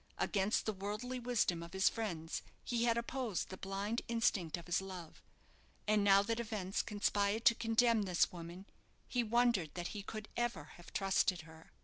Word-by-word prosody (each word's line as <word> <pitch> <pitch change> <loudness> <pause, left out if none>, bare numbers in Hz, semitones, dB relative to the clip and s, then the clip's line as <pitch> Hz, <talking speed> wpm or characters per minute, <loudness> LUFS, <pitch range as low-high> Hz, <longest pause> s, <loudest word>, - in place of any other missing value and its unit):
Against 200 +1 +1
the 215 - 0
worldly 210 +6 -4
wisdom 235 -8 +1
of 170 0 -9
his 190 +1 +3
friends 170 -8 -2 0.2
he 235 -1 0
had 230 -1 +3
opposed 235 -4 -2
the 190 - -6
blind 200 +5 -2
instinct 210 -8 +1
of 170 - -10
his 175 +1 +1
love; 185 -4 -8 0.7
and 210 -1 +4
now 200 0 +6
that 230 +2 -1
events 210 -5 -2
conspired 205 +1 0
to 235 - +8
condemn 230 0 +3
this 180 -3 +2
woman, 175 +2 -8 0.4
he 245 -1 +1
wondered 235 -7 +2
that 175 -1 -3
he 210 - -5
could 215 +1 -7
ever 235 -11 -2
have 175 - -13
trusted 190 -2 +2
her. 160 0 -15
205 Hz, 170 wpm, -36 LUFS, 180-230 Hz, 0.7 s, to